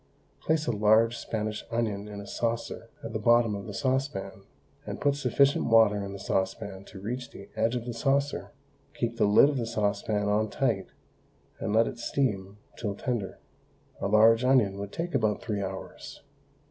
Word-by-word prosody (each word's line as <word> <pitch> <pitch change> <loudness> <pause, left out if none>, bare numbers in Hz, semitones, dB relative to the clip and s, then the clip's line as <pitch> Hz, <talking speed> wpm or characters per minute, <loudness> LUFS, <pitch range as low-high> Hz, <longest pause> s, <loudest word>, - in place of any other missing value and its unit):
Place 155 -1 0
a - - +1
large 110 +2 +4
Spanish 110 -2 -3
onion 110 -4 -2
in 105 -1 -7
a 100 - -8
saucer 115 +2 -3
at 115 - -6
the 110 - -1
bottom 115 0 +4
of 100 -2 -5
the - - -6
saucepan, 130 -8 -2 0.4
and - - -6
put 145 -1 +2
sufficient 140 +1 +2
water 110 -3 +4
in 100 - -5
the 100 - -6
saucepan 95 0 -2
to 95 - -11
reach 125 +6 -4
the 100 - -12
edge 115 +2 +1
of 120 -1 -3
the 120 - -4
saucer; 140 +4 0 0.4
keep 115 -1 -2
the - - +3
lid 105 +7 +7
of 145 - -2
the 115 -2 -2
saucepan 105 -1 0
on 105 +1 +1
tight, 115 -9 0 0.7
and - - -2
let 115 +2 +4
it - - -6
steam 105 -7 -1 0.2
till 105 -3 -3
tender. 115 -4 -3 0.6
A - - -1
large 110 +3 +5
onion 120 -7 +3
would 100 0 -5
take 170 +1 -4
about 110 -6 +1
three 105 -3 -2
hours. 95 - -7
110 Hz, 180 wpm, -28 LUFS, 100-120 Hz, 0.7 s, lid